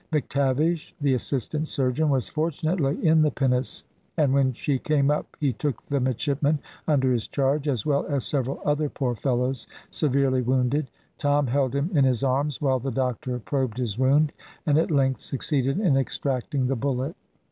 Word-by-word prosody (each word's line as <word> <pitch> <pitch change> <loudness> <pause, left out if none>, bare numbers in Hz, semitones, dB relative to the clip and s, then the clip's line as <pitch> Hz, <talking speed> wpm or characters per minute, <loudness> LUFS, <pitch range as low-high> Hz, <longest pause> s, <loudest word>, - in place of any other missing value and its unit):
McTavish, 150 +2 0
the 145 -3 +2
assistant 140 +4 -1
surgeon, 140 +3 +1
was 130 -7 +1
fortunately 155 -1 -1
in 160 0 +5
the 155 - +4
pinnace, 130 -2 0 0.3
and 145 -4 +3
when 135 -1 +3
she 135 +2 -1
came 145 -1 +2
up 150 - -3
he 140 -5 +1
took 145 +4 -2
the 140 -1 -1
midshipman 140 +4 0 0.3
under 135 -4 +3
his 115 -3 -1
charge, 140 +2 0
as 125 -7 0
well 140 -2 +1
as 140 -3 -1
several 135 -2 -1
other 150 0 +1
poor 130 -4 -2
fellows 125 0 -1 0.2
severely 135 -3 +2
wounded. 130 +3 +1 0.3
Tom 145 0 +2
held 130 +1 0
him 140 +6 0
in 145 -4 +4
his 130 -1 +2
arms 135 +1 0
while 135 -3 +1
the 135 +3 -3
doctor 125 0 -2
probed 130 -1 -2
his 120 -6 -2
wound, 145 +3 +3 0.3
and 150 -1 +3
at 165 - +1
length 135 -4 +1
succeeded 135 +2 0
in 180 -10 +3
extracting 135 0 -1
the 135 +2 0
bullet. 135 - -2
135 Hz, 170 wpm, -25 LUFS, 130-150 Hz, 0.3 s, in